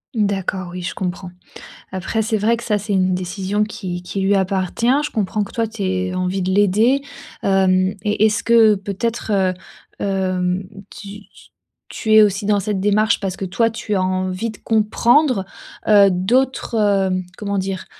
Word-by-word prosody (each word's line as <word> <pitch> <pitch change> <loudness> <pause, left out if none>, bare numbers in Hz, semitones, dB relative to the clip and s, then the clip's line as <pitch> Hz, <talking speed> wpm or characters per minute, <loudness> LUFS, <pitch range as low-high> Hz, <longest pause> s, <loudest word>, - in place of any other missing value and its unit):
D'accord, 195 -3 -1
oui 180 0 -6
je 175 - -4
comprends. 180 -1 -4 0.6
Après, 190 +4 -2
c'est 220 0 0
vrai 220 +3 +2
que 235 - -9
ça, 210 -3 0
c'est 205 0 -4
une 185 -1 +2
décision 190 +3 -2
qui 180 -4 -6
qui 195 +2 -4
lui 195 +1 +2
appartient, 190 +3 -1 0.2
je 300 - -4
comprends 210 0 -1
que - - -9
toi, 230 -1 -1
tu 220 -1 -9
aies 185 -1 -1
envie 185 +1 -1
de 185 +1 -1
l'aider. 210 +7 +3 0.4
Hem, 190 0 +2
et 210 0 +2
est-ce 210 -2 +1
que 230 -2 +5
peut-être, 210 +3 -3
heu 190 -2 +2 0.5
hem, 185 -1 -1 0.3
tu 205 0 -10
t - - -34 0.6
tu 220 - -1
es 215 0 +8
aussi 200 0 0
dans 205 -1 +3
cette 200 0 -2
démarche 210 +3 +2
parce 190 -2 -4
que 195 - -4
toi, 225 +5 +1
tu 225 -2 -5
as 190 - +1
envie 185 +3 -2
de 215 - -10
comprendre, 230 +2 +2 0.4
heu, 205 -2 +6
d'autres, 240 +10 0
hem, 195 -3 +1
comment 200 -1 -3
dire? 190 0 -4
200 Hz, 175 wpm, -19 LUFS, 185-215 Hz, 0.6 s, es